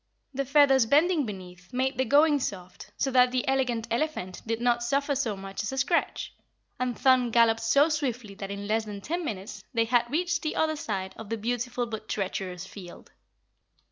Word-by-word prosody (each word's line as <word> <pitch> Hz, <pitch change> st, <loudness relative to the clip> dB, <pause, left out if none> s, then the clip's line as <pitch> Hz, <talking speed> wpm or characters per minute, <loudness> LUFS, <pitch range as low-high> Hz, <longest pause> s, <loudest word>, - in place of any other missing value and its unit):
The 275 Hz, +1 st, -2 dB
feathers 270 Hz, -3 st, +5 dB
bending 305 Hz, +1 st, +3 dB
beneath 180 Hz, -3 st, -9 dB
made 260 Hz, +1 st, -1 dB
the 260 Hz, -, +3 dB
going 290 Hz, +1 st, +4 dB
soft 185 Hz, -7 st, -6 dB
so 270 Hz, -, 0 dB
that 250 Hz, -1 st, +5 dB
the 255 Hz, 0 st, -1 dB
Elegant 255 Hz, -4 st, 0 dB
Elephant 235 Hz, -, -2 dB
did 225 Hz, 0 st, -1 dB
not 240 Hz, 0 st, +2 dB
suffer 280 Hz, +4 st, 0 dB
so 235 Hz, -7 st, -1 dB
much 195 Hz, 0 st, -6 dB
as 215 Hz, -, -3 dB
a 265 Hz, -, -5 dB
scratch, 305 Hz, +6 st, 0 dB, 0.5 s
and 250 Hz, -1 st, -1 dB
Thun 255 Hz, -2 st, +4 dB
galloped 225 Hz, -1 st, +4 dB
so 280 Hz, +6 st, +4 dB
swiftly 255 Hz, -9 st, -2 dB
that 195 Hz, 0 st, -7 dB
in 200 Hz, 0 st, -5 dB
less 220 Hz, +1 st, 0 dB
than 205 Hz, -1 st, -7 dB
ten 340 Hz, -, -3 dB
minutes 200 Hz, -, -6 dB
they 230 Hz, 0 st, +3 dB
had 240 Hz, 0 st, +2 dB
reached 345 Hz, +4 st, 0 dB
the 310 Hz, -, -2 dB
other 315 Hz, 0 st, +1 dB
side 195 Hz, -9 st, -4 dB
of 225 Hz, -2 st, -9 dB
the 225 Hz, -, -2 dB
beautiful 245 Hz, +2 st, -2 dB
but 220 Hz, -2 st, -7 dB
treacherous 190 Hz, -2 st, -3 dB
field. 190 Hz, -3 st, -12 dB
240 Hz, 190 wpm, -27 LUFS, 210-275 Hz, 0.5 s, feathers